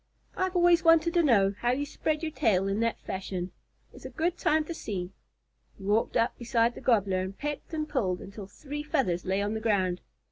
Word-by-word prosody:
"I've 375 0 -1
always 350 -1 +5
wanted 330 0 +5
to 345 - +4
know 205 -10 +4
how 240 - 0
you 285 +3 -1
spread 305 +2 -2
your 315 - -2
tail 195 -9 +2
in 195 +2 -1
that 230 0 0
fashion. 185 -1 -4 0.4
It's - - -14
a - - -6
good 340 +2 -1
time 315 -2 +2
to 335 - -5
see." 185 - -5 0.7
He 195 - -13
walked 210 +3 +1
up 230 - +1
beside 235 -1 +1
the - - -10
Gobbler 200 -6 +2
and 190 +1 -5
pecked 295 +2 -5
and 310 -2 -2
pulled 190 -12 -1
until 200 0 -9
three 290 +7 -7
feathers 265 - 0
lay 190 +2 0
on 205 +1 -1
the 220 - -2
ground. 190 -5 +1
230 Hz, 210 wpm, -28 LUFS, 195-305 Hz, 0.7 s, always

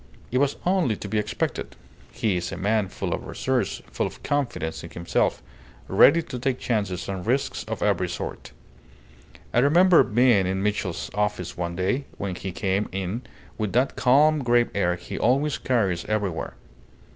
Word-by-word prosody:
It 125 - +2
was 140 0 +2
only 180 - +2
to 100 - -7
be 105 +2 0
expected. 105 0 -3 0.4
He 105 -4 0
is 90 - -3
a - - -5
man 105 +1 +1
full - - -4
of - - -5
resource, - - -1
full - - -1
of - - -12
confidence 120 - -2
in - - -8
himself, 85 0 -1 0.4
ready 170 0 +6
to 125 - -6
take 130 0 0
chances 100 -8 -2
and 95 -2 -4
risks 130 +6 0
of - - -4
every - - +1
sort. - - -6 1.0
I - - +4
remember 170 +7 +6
being 115 -4 +3
in 95 +1 -1
Mitchell's 100 -4 -2
office 105 -4 -1
one 85 -1 -3
day, 100 +10 0
when 100 -2 -3
he 95 +1 -5
came 95 +3 -1
in 95 +5 -3 0.4
with 105 -2 -2
that 130 +3 +2
calm, 145 +4 +4
grave 120 0 +3
air 90 -3 +1
he - - -7
always 140 +5 +2
carries 100 -9 0
everywhere. 100 -11 -2
105 Hz, 170 wpm, -25 LUFS, 95-130 Hz, 1.0 s, ready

